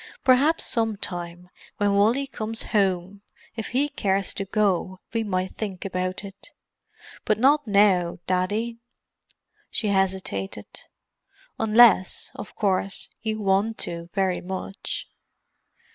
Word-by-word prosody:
Perhaps 275 +6 +4
some 225 -3 0
time, 175 -2 -4 0.3
when 205 -1 +2
Wally 225 +7 +3
comes 225 -4 -4
home, 195 -1 +1 0.3
if 225 -3 -4
he 270 +4 +1
cares 200 -9 0
to 195 - -4
go 190 -2 0
we 225 -1 0
might 185 -3 -2
think 200 -4 -5
about 185 0 -2
it. 195 0 -11 0.7
But 215 - +1
not 280 +4 +4
now, 200 -4 +3
Daddy." 210 +6 -1 0.9
She 215 - -1
hesitated. 185 - -1 0.9
"Unless, 220 -4 +5
of - - -9
course, 195 -1 -1
you 220 -1 -2
want 200 +3 +1
to 170 0 -6
very 190 -2 +1
much." 190 +1 -5
200 Hz, 115 wpm, -25 LUFS, 185-220 Hz, 0.9 s, Unless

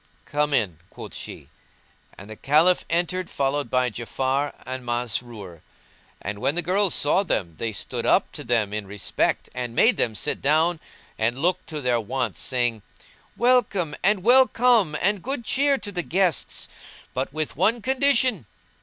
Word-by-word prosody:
"Come 150 0 0
in," 95 - 0
quoth - - -10
she; - - -8 0.7
and 95 - -11
the 110 - -9
Caliph 155 +9 +3
entered 175 +2 -1
followed 140 -1 -1
by 125 0 +1
Ja'afar 130 +5 -1
and 130 0 -5
Masrur; 120 -7 -4 0.6
and 100 +1 -5
when 135 +6 0
the 175 - -1
girls 190 +2 +2
saw 150 +6 +3
them 95 - -2
they 115 - -2
stood 100 - -4
up - - +2
to - - -6
them 115 -4 0
in 105 -2 -4
respect 100 +1 -1
and 120 -2 -5
made 235 - +4
them 110 -2 0
sit - - -2
down 160 +4 +2 0.4
and 115 +3 0
looked 175 +6 0
to 155 -3 -5
their 125 -3 +1
wants, 115 0 -3
saying, 120 -4 0 0.6
"Welcome, 210 -10 +2
and 195 -1 +2
well 255 +3 +6
come 230 -10 +3
and 200 0 +1
good 255 0 -4
cheer 280 0 +2
to 205 - -7
the 180 -3 -1
guests, 180 -2 -1 0.5
but 130 +1 -2
with 155 +1 -3
one 215 - +2
condition!" 255 - +2
145 Hz, 165 wpm, -24 LUFS, 120-195 Hz, 0.7 s, well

